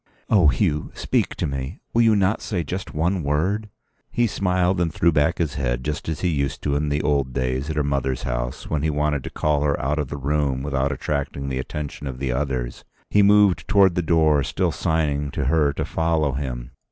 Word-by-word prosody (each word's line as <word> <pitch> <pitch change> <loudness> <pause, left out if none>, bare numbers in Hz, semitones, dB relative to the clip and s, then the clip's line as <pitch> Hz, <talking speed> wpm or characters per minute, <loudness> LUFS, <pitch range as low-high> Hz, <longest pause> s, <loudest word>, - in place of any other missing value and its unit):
"Oh, 95 -7 +6
Hugh, 75 +3 +1
speak - - 0
to - - -2
me! 70 +3 -4
Will 120 - +4
you 115 -2 +5
not 100 +1 +1
say 90 -6 -2
just 90 +3 -5
one 85 +4 +1
word?" 90 +9 0 0.4
He 120 - +2
smiled 90 -3 +1
and 85 -2 +1
threw 85 +2 +3
back 80 +3 +2
his 80 -6 -1
head, - - -2
just 75 +1 -3
as 80 - -3
he 90 - +1
used 70 -4 -2
to 70 -1 0
in 75 +1 0
the 75 +1 0
old 70 -3 +1
days 65 +2 -1
at 80 - -2
her 75 - +1
mother's 70 -2 -1
house - - -3
when 75 -2 -1
he 80 - +1
wanted 75 -2 0
to - - -4
call 75 -2 0
her 75 -1 +1
out 75 +3 -1
of 75 - -1
the 70 - -5
room 70 -1 0
without 70 -1 0
attracting 70 0 -3
the 65 -1 -2
attention 75 +1 -5
of 65 -2 -5
the 65 -1 -2
others. 65 -2 -2 0.3
He 105 - +5
moved 100 -2 +4
towards 100 -3 +5
the 90 - 0
door, 80 -3 +3
still - - 0
signing 75 -3 0
to 70 - -1
her 75 0 +3
to - - -2
follow 80 -3 +1
him. 65 -3 -4
75 Hz, 215 wpm, -23 LUFS, 70-85 Hz, 0.4 s, Oh